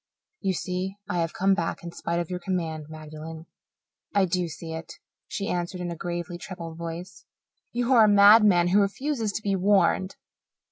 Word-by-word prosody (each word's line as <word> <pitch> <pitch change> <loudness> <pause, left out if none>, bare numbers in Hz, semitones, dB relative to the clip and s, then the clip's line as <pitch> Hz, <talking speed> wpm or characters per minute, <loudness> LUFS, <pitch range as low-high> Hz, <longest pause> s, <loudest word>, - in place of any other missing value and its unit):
"You 190 - 0
see 185 +2 -3
I 175 - -1
have 165 -1 -1
come 195 +1 +3
back 170 -3 -2
in 170 - -6
spite 170 0 -2
of 175 0 -4
your 180 - -2
command, 165 -5 -3
Magdalen." 155 +1 -9 0.7
"I 200 -1 +5
do 180 0 0
see 160 0 -7
it," 160 +1 -7 0.3
she 200 - -4
answered 180 -1 -2
in 175 -1 -3
a - - -4
gravely 175 +1 -4
troubled 170 -3 -7
voice. 170 +3 -7 0.5
"You 245 +2 +1
are 225 -3 +7
a - - +4
madman 205 -3 +7
who 200 +3 +5
refuses 225 +2 -1
to 215 - -4
be 200 -1 +1
warned." 190 0 +2
180 Hz, 180 wpm, -26 LUFS, 170-200 Hz, 0.7 s, are